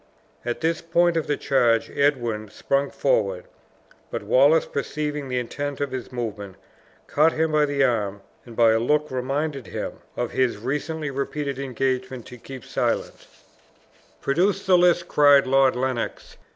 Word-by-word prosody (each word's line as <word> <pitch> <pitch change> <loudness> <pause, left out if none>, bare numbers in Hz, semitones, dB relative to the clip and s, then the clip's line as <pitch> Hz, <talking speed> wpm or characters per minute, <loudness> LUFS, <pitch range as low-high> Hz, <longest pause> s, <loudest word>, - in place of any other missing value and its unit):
At 120 0 -3
this 165 0 0
point 170 +1 +2
of 165 - -1
the 145 - 0
charge 120 -4 +2
Edwin 120 -7 0
sprung 140 +6 -1
forward; - - 0 0.6
but - - -4
Wallace, - - +4
perceiving 150 - -3
the 125 - -1
intent 140 +3 -4
of 145 -1 -2
his 130 -1 -6
movement, 105 -6 -5 0.5
caught 155 +3 +3
him 160 0 0
by 150 -1 +3
the 140 -1 +1
arm, 105 -6 0 0.2
and, 120 -2 -12
by 115 -1 +5
a 110 - +3
look, 150 +5 +1
reminded 135 +1 -2
him - - -5 0.2
of 120 -1 -2
his 130 -4 +1
recently 150 +5 -3
repeated 140 0 -3
engagement 130 -1 -2
to 125 - -11
keep 130 0 -10
silent. - - -2 0.9
"Produce 185 +8 +1
the 190 -1 +5
list," 175 -1 +3
cried 145 -1 +5
Lord 135 0 +3
Lennox. 125 -2 -3
140 Hz, 150 wpm, -24 LUFS, 125-155 Hz, 0.9 s, by